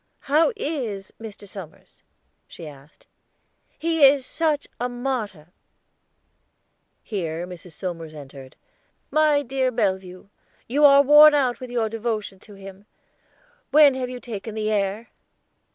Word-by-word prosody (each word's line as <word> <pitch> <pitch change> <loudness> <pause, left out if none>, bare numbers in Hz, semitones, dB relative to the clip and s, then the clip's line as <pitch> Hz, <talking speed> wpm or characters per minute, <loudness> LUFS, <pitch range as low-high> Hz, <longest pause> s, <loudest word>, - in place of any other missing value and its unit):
"How 305 - +2
is 245 - -4
Mr. 210 -2 -10
Somers?" 185 -5 -12 0.5
she 165 - -10
asked. 145 0 -16 0.7
"He 325 -2 0
is 275 -1 +6
such 310 -2 -1
a 245 +1 -2
martyr." 240 - -4 1.5
Here 170 -5 -4
Mrs. 180 -1 -11
Somers 165 -2 -6
entered. 135 -2 -12 0.6
"My 305 -2 +3
dear 260 0 -1
Bellevue, 190 -5 -3 0.4
you 290 +5 +3
are 280 0 +7
worn 295 +2 +8
out 255 -4 +1
with 255 -1 -8
your 235 -2 -1
devotion 215 -3 -4
to 205 +1 -15
him; 195 +1 -13 0.8
when 290 0 +6
have 255 -1 -4
you 250 0 -7
taken 220 -2 -7
the 215 0 -2
air?" 205 +2 -2
225 Hz, 125 wpm, -23 LUFS, 190-275 Hz, 1.5 s, worn